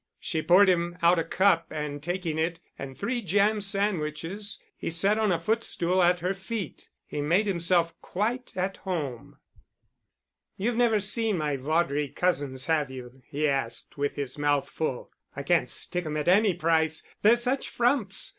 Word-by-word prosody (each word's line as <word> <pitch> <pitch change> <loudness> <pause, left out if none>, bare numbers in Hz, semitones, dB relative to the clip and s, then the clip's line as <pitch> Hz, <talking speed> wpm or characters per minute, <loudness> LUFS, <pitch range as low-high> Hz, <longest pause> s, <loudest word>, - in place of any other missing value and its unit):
She 160 -4 -2
poured 180 +6 +6
him 175 -1 +1
out 170 +1 +5
a - - +1
cup, 185 -3 +2
and 150 -1 -5
taking 170 -1 -3
it 165 +1 -1 0.2
and 135 -1 -7
three 240 +4 -2
jam 205 +2 +2
sandwiches, 195 -1 -1 0.2
he - - -4
sat 195 +6 +3
on 215 -3 +2
a 175 - +2
footstool 185 -2 0
at 175 0 +3
her 180 +2 0
feet. 195 -1 -6 0.2
He 145 - -4
made 175 +8 +2
himself 170 -3 +1
quite 235 +7 -2
at 190 +1 -2
home. 150 - -5 1.2
"You've 230 +5 -1
never 230 -3 +3
seen 210 0 +1
my 150 -3 -1
Vaudrey 145 +1 0
cousins, 140 -6 -1
have 155 -4 +1
you?" 130 0 -10
he 150 0 -1
asked, 135 -5 -2
with 145 0 -2
his 140 0 -4
mouth 145 -1 +1
full. 145 -6 -3 0.2
"I 140 - -5
can't 155 -5 +2
stick 180 +4 -3
'em 155 0 -3
at 150 - -3
any 195 +1 +4
price, 160 -2 +2 0.2
they're 220 +3 +6
such 250 +3 -1
frumps. 235 -5 +1
175 Hz, 165 wpm, -27 LUFS, 150-200 Hz, 1.2 s, poured